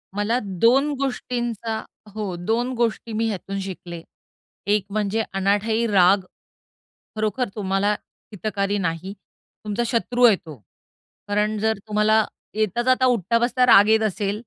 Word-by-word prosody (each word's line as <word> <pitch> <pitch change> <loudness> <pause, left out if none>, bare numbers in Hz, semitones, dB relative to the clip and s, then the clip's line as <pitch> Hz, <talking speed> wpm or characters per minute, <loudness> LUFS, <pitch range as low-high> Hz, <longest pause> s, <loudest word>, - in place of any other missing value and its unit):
मला 220 +4 +1
2 235 - +2
गोष्टींचा 240 -4 -3 0.4
हो, 200 -5 -3
2 230 +8 -1
गोष्टी 230 -1 -1
मी 225 +1 0
ह्यातून 195 0 -4
शिकले. 175 -3 -7 0.7
एक 205 -1 +2
म्हणजे 215 +1 -1
अनाठायी 205 +4 +1
राग, 195 -1 +4 0.9
खरोखर 215 +2 -1
तुम्हाला 200 0 0 0.4
हितकारी 200 0 -2
नाही, 180 +1 -3 0.5
तुमचा 210 +3 -1
शत्रू 245 +1 0
आहे 220 -4 +7
तो. 160 -5 -11 0.7
कारण 210 +1 0
जर 220 -1 +1
तुम्हाला 215 +1 +3 0.3
येता 215 +1 0
जाता, 255 +1 +3
उठता 230 -2 +2
बसता 250 +1 +2
राग 210 -3 +7
येत 220 0 +4
असेल 200 +1 -2
215 Hz, 130 wpm, -23 LUFS, 195-230 Hz, 0.9 s, आहे